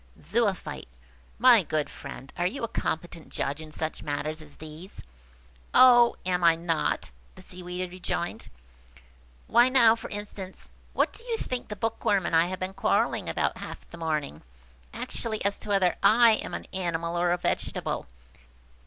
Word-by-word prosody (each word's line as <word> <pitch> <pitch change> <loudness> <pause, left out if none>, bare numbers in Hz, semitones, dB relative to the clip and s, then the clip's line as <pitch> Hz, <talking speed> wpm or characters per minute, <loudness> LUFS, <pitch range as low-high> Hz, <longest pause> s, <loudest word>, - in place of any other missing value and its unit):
Zoophyte. 200 +3 -1 0.5
"My 240 -2 +7
good 155 -3 -1
friend, 135 - -10
are 175 0 +1
you 235 +6 -5
a - - 0
competent 170 -4 -4
judge 140 +3 -3
in 155 -1 -10
such 160 +1 -4
matters 155 +1 -3
as 150 -2 -11
these?" 155 +5 -10 0.7
"Oh, 240 -2 +7
am 180 -1 0
I 165 -1 +6
not!" 165 - -1 0.2
the - - -13
Seaweed 180 0 -6
rejoined. 175 -1 -4 1.0
"Why 240 +2 +5
now, 235 -4 +6
for 230 - -8
instance, 205 -2 -7 0.2
what - - +1
do - - -12
you 465 -2 -1
think 255 - -4
the 210 - -5
Bookworm 205 -3 0
and - - 0
I 165 +1 +5
have 185 0 -5
been 185 +1 -3
quarrelling 195 - +1
about - - -1
half - - -8
the 170 - -9
morning? 155 - -2 0.5
Actually 220 -3 -3
as 200 0 0
to 215 - -9
whether 195 -3 +3
I 235 +1 +7
am 215 - -1
an - - -6
animal 170 -2 -2
or 175 0 +2
a 175 - +2
vegetable. - - -2
180 Hz, 160 wpm, -27 LUFS, 165-215 Hz, 1.0 s, My